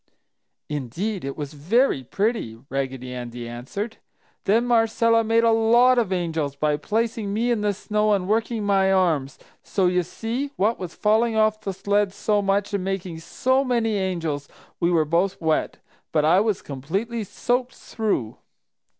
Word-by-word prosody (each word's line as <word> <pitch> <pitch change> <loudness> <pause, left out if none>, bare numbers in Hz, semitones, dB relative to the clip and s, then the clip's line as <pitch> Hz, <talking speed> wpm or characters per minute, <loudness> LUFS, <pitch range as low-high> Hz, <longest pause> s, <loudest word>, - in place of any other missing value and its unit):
"Indeed 155 - -3
it 135 0 -5
was 145 -1 -5
very 170 - +2
pretty!" 200 - -1
Raggedy 130 -2 -3
Andy 120 -1 -6
answered. 135 - -5 0.5
"Then 225 +5 +3
Marcella 230 -1 +3
made 225 +1 +3
a 230 - +5
lot 235 +3 +5
of 215 -5 -1
'angels' 165 -6 -1
by 150 +1 +1
placing 220 +4 -1
me 230 +4 0
in 230 -3 +1
the 210 0 +2
snow 210 +1 0
and 190 -2 0
working 225 +1 0
my 195 -1 +3
arms; 160 -8 +1 0.2
so 190 - 0
you 180 0 +3
see, 230 - -4
what 215 +4 +1
with 180 -3 -5
falling 220 +2 +2
off 215 0 +2
the 200 - -3
sled 200 +1 0
so 210 0 +1
much 200 +1 0
and 200 -2 -1
making 185 -3 -3
so 260 +10 +1
many 235 -4 +1
'angels,' 170 -7 -2 0.3
we 170 - +2
both 170 +5 0
were 160 - -5
wet, 155 - 0 0.3
but 150 -2 +2
I 170 +4 +5
was 210 -2 0
completely 195 - -3
soaked 245 +5 -1
through. 205 - -2
200 Hz, 160 wpm, -24 LUFS, 160-225 Hz, 0.5 s, a